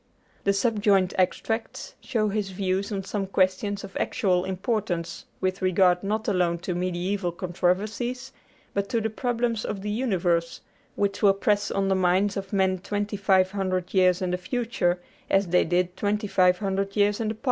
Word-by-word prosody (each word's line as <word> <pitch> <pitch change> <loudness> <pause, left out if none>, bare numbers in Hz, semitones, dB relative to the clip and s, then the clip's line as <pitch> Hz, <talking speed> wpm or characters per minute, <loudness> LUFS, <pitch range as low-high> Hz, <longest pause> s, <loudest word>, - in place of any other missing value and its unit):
The 200 - +4
subjoined 200 -3 +2
extracts 225 +5 -1
show 215 -4 0
his 205 -1 -2
views 190 +2 -1
on 195 -2 -2
some 195 0 -3
questions 195 +2 0
of 195 - -10
actual 185 -6 +1
importance, 190 -4 -2
with 185 +1 -1
regard 185 -1 +3
not 215 +2 -2
alone 180 -4 +1
to 180 - -1
mediæval 180 0 -2
controversies, 215 +9 -1 0.4
but 200 0 -1
to 230 - +1
the 220 0 -2
problems 235 -1 -1
of 195 -2 -4
the 210 - -2
universe, 180 -8 0 0.3
which 200 -1 -1
will 195 -2 +5
press 205 +1 +1
on 195 0 0
the 195 - +3
minds 190 +2 +2
of 195 -1 -5
men 190 -2 +1
twenty 205 +2 -3
five 190 -2 +3
hundred 185 -2 -2
years 185 -1 +3
in 180 - -1
the 180 - -1
future 185 -4 -1 0.3
as 195 +1 +3
they 180 +1 +4
did 180 +1 0
twenty 205 +2 -1
five 180 -2 +3
hundred 195 0 -2
years 205 0 +2
in 225 - -1
the 215 - -1
past. - - -25
195 Hz, 175 wpm, -26 LUFS, 185-210 Hz, 0.4 s, will